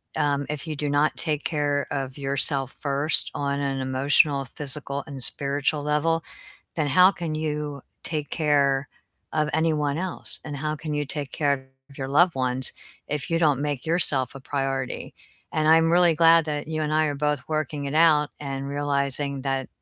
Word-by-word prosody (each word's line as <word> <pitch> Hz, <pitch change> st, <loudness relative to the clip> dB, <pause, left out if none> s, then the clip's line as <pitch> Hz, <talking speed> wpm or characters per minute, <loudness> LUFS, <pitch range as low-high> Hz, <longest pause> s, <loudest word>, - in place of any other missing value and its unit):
Um, 145 Hz, -2 st, 0 dB
if 150 Hz, +1 st, -4 dB
you 155 Hz, -, -4 dB
do 145 Hz, 0 st, -3 dB
not 145 Hz, +2 st, +2 dB
take 150 Hz, -2 st, -1 dB
care 145 Hz, -2 st, -1 dB
of 135 Hz, -1 st, -4 dB
yourself 135 Hz, 0 st, +3 dB
first 145 Hz, +2 st, +2 dB
on 140 Hz, 0 st, -2 dB
an 135 Hz, -1 st, -2 dB
emotional, 135 Hz, +2 st, +2 dB
physical, 140 Hz, -1 st, -1 dB
and 140 Hz, -3 st, -4 dB
spiritual 145 Hz, +3 st, +3 dB
level, 160 Hz, +2 st, 0 dB, 0.5 s
then 155 Hz, -3 st, -1 dB
how 180 Hz, +7 st, +6 dB
can 170 Hz, -5 st, -4 dB
you 150 Hz, -2 st, -3 dB, 0.2 s
take 150 Hz, -3 st, -4 dB
care 140 Hz, -3 st, +1 dB, 0.4 s
of 155 Hz, -1 st, 0 dB
anyone 150 Hz, -3 st, +1 dB
else? 185 Hz, 0 st, -2 dB
And 145 Hz, -2 st, -6 dB
how 150 Hz, +2 st, -3 dB
can 155 Hz, 0 st, -6 dB
you 145 Hz, -1 st, -2 dB
take 145 Hz, -1 st, -5 dB
care 140 Hz, -3 st, -1 dB, 0.2 s
of 140 Hz, -, -17 dB
your 135 Hz, -1 st, -4 dB
loved 170 Hz, +4 st, +4 dB
ones 130 Hz, 0 st, 0 dB, 0.4 s
if 150 Hz, +2 st, -3 dB
you 165 Hz, -, +2 dB
don't 145 Hz, -4 st, +2 dB
make 145 Hz, -1 st, -3 dB
yourself 145 Hz, -6 st, +1 dB
a 135 Hz, -, -9 dB
priority? 135 Hz, -1 st, -3 dB, 0.4 s
And 155 Hz, 0 st, +1 dB
I'm 165 Hz, 0 st, +5 dB
really 175 Hz, -1 st, +4 dB
glad 165 Hz, 0 st, +5 dB
that 150 Hz, 0 st, -4 dB
you 155 Hz, -1 st, -2 dB
and 150 Hz, 0 st, -2 dB
I 155 Hz, 0 st, +3 dB
are 145 Hz, -, -2 dB
both 150 Hz, -1 st, -1 dB
working 150 Hz, -2 st, -2 dB
it 140 Hz, -, -4 dB
out 155 Hz, -2 st, +4 dB
and 135 Hz, -1 st, -5 dB
realizing 140 Hz, -1 st, -2 dB
that 135 Hz, -1 st, -2 dB
145 Hz, 180 wpm, -24 LUFS, 140-155 Hz, 0.5 s, how